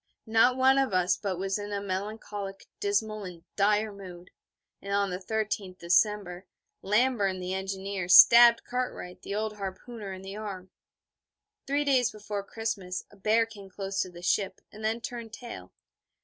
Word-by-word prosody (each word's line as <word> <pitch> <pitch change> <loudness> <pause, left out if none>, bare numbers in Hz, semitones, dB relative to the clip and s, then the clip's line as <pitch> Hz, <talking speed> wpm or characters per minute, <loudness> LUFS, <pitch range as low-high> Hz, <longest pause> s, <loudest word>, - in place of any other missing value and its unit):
Not 225 +3 +4
one 265 +1 +5
of 265 -7 +1
us 180 0 +3
but 195 -4 -3
was 195 +2 -1
in 205 0 -6
a 200 - -1
melancholic, 200 0 -5
dismal 210 +1 -1
and 175 -3 -9
dire 210 +1 +2
mood; 180 -2 -11 0.5
and 200 - -6
on 200 -1 +1
the 180 - -3
13th 205 -2 -3
December 185 +1 +1 0.3
Lamburn, 210 -3 +2
the 180 0 -3
engineer, 190 -1 -3
stabbed 235 +4 +9
Cartwright, 250 -8 -4
the 200 - -5
old 215 0 -2
harpooner, 200 +2 -6
in 190 0 -8
the 195 +1 -7
arm. 195 -3 -7 1.0
Three 285 +2 +1
days 260 -4 +3
before 210 -1 -5
Christmas 200 -4 -4
a - - -16
bear 215 +3 +2
came 205 -4 -12
close 195 0 -3
to 185 - -3
the 175 0 -12
ship, 190 +1 0
and 215 +1 -11
then 225 +2 0
turned 235 -2 -7
tail. 240 0 -9
200 Hz, 165 wpm, -28 LUFS, 190-220 Hz, 1.0 s, stabbed